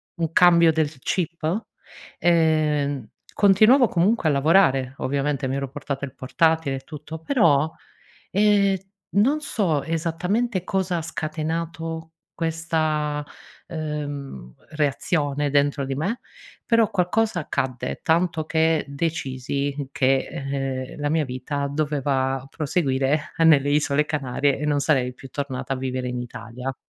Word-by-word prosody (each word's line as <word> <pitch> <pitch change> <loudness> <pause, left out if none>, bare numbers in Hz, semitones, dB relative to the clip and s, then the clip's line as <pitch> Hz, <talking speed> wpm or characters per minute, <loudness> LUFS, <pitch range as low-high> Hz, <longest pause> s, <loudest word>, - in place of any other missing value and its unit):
un 165 -2 -2
cambio 170 -2 +6
del 155 -3 -1
chip, 170 - -2 0.5
ehm, 150 -6 +2 0.3
continuavo 215 +6 +6
comunque 180 -1 +2
a - - +3
lavorare, 140 -3 +3
ovviamente 140 0 -1
mi 130 - -2
ero 140 -1 -3
portata 140 0 -4
il 130 - -11
portatile 160 +2 +1
e - - -6
tutto 150 +2 -8
però, 160 - +3 0.6
ehm, 200 -1 +3 0.4
non 275 +9 +3
so 175 - 0
esattamente 180 +6 -1
cosa 190 -2 -1
ha - - -3
scatenato 160 +1 -4 0.3
questa, 155 -2 -1 0.4
uhm, 145 - -5 0.2
reazione 145 -1 0
dentro 145 0 +2
di 135 0 -3
me, 195 - -2 0.5
però 230 -2 +3
qualcosa 205 +1 +1
accadde, 130 -5 -3
tanto 165 -1 +1
che 160 -1 +2
decisi 140 -2 -3
che, 135 0 +2 0.7
ehm, - - -10
la 145 - 0
mia 160 -1 +2
vita 140 +2 -3
doveva 135 -3 0
proseguire 145 -2 0
nelle 145 -3 +5
isole 150 0 +2
Canarie 140 -1 0
e 150 - -3
non 145 -1 +2
sarei 130 -4 +1
più 135 - -12
tornata 135 -1 -3
a - - -4
vivere 130 -1 -3
in 125 0 -3
Italia. 120 +2 -6
150 Hz, 125 wpm, -23 LUFS, 140-165 Hz, 0.7 s, cambio